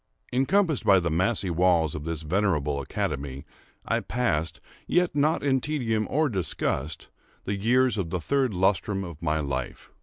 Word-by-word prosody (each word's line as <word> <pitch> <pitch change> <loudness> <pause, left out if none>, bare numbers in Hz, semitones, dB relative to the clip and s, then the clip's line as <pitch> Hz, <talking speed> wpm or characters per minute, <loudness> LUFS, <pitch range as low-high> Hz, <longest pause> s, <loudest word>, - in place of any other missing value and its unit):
Encompassed 155 +4 +2
by 95 -1 +6
the 85 -2 -1
massy 95 +3 +1
walls 85 -3 +3
of 75 0 -6
this 80 -1 -4
venerable 75 -5 0
academy, 70 +1 -4 0.4
I - - +1
passed, 85 -10 -1 0.3
yet 180 0 +2
not 150 +2 +2
in 135 -2 +2
tedium 115 -8 -1
or 155 +2 +2
disgust, 85 - -2 0.3
the 100 - -2
years 120 +2 +2
of 85 -4 -2
the 90 - -2
third 135 - +1
lustrum 95 +1 +1
of 85 -4 -9
my 80 -1 0
life. 65 -4 -4
95 Hz, 155 wpm, -26 LUFS, 80-125 Hz, 0.4 s, by